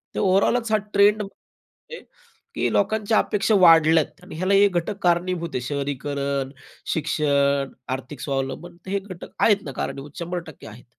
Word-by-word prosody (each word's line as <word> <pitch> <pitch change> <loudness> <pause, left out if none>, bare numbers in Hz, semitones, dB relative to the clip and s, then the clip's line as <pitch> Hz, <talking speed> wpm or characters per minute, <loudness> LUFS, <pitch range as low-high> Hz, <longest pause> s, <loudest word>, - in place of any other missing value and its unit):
तर - - -1
ओव्हरऑलच 215 +4 +2
हा 215 - +4 0.2
ट्रेंड 205 +1 +4
आहे 210 - -13 0.6
की - - 0
लोकांच्या 215 +1 +1
अपेक्षा 210 +1 +1
वाढल्या 165 -2 +6
आहेत 185 - -19
आणि 180 - -10
ह्याला 185 +4 0
हे 200 +1 +6
घटक 180 +3 -2
कारणीभूत 175 -1 +1
आहेत, 125 - -2
शहरीकरण, 140 -1 -3 0.4
शिक्षण, 140 -3 +1 0.2
आर्थिक 130 +1 -7
स्वावलंबन, 135 +5 -4
हे 200 +1 -1
घटक 190 -3 -10
आहेत 205 -3 +3
ना, 140 - -5
कारणीभूत 140 +2 -6
100% 170 -3 -6
आहेत. 110 +3 -13
170 Hz, 150 wpm, -23 LUFS, 140-200 Hz, 0.6 s, वाढल्या